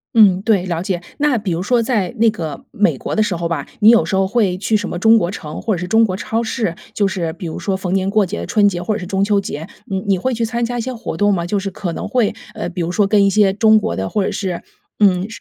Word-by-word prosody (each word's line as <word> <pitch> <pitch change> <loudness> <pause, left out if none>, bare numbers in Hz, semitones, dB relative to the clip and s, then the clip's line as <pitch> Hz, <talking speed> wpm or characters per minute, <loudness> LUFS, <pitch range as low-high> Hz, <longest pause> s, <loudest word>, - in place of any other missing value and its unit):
嗯， 195 -5 +6
对， 200 -4 +2
了 170 -2 -2
解。 185 -2 -2 0.2
那 290 -4 +2
比 205 -3 -3
如 170 +1 -1
说 235 +3 +2
在 215 -6 0
那 230 +1 +4
个 160 -6 -6
美 210 +1 +1
国 - - -4
的 215 - +2
时 200 -4 0
候 170 0 -2
吧， 165 - -3
你 215 0 +7
有 235 0 +5
时 195 - -2
候 190 0 +2
会 195 -4 +1
去 210 +3 0
什 205 -2 -1
么 175 - -4
中 225 +4 +5
国 170 - -1
城， 155 -5 -7
或 220 -4 0
者 - - -4
是 180 +1 -4
中 225 +2 +4
国 190 -4 0
超 225 +2 -2
市， 220 -5 -2 0.2
就 200 -2 +2
是 175 -4 -2
比 180 - -8
如 160 - -5
说 195 -2 -1
逢 185 -1 -3
年 195 0 +1
过 210 -1 +3
节、 195 +4 -5
春 205 -2 +3
节 175 -3 -1
或 210 +4 -1
者 - - -3
是 180 - -6
中 195 +1 0
秋 205 0 +2
节， 165 -5 -5 0.2
你 190 -1 -2
你 195 -1 +1
会 255 +7 -1
去 230 0 -2
参 235 +1 -1
加 245 +1 -3
一 - - 0
些 260 - -4
活 230 -8 -5
动 205 +4 +2
吗？ 170 -3 0
就 200 +3 -1
是 195 0 -3
可 185 -3 -5
能 - - -5
会 240 -6 +1 0.2
呃， 170 - -3
比 180 0 -4
如 170 - -2
说 200 +2 +2
跟 200 0 +3
一 200 - +4
些 195 -1 +3
中 220 +1 +5
国 215 - -1
的， 95 0 -3
或 205 - 0
者 - - -1
是 185 -4 -3 0.3
嗯 190 -2 +3
200 Hz, 320 characters per minute, -18 LUFS, 180-220 Hz, 0.3 s, 你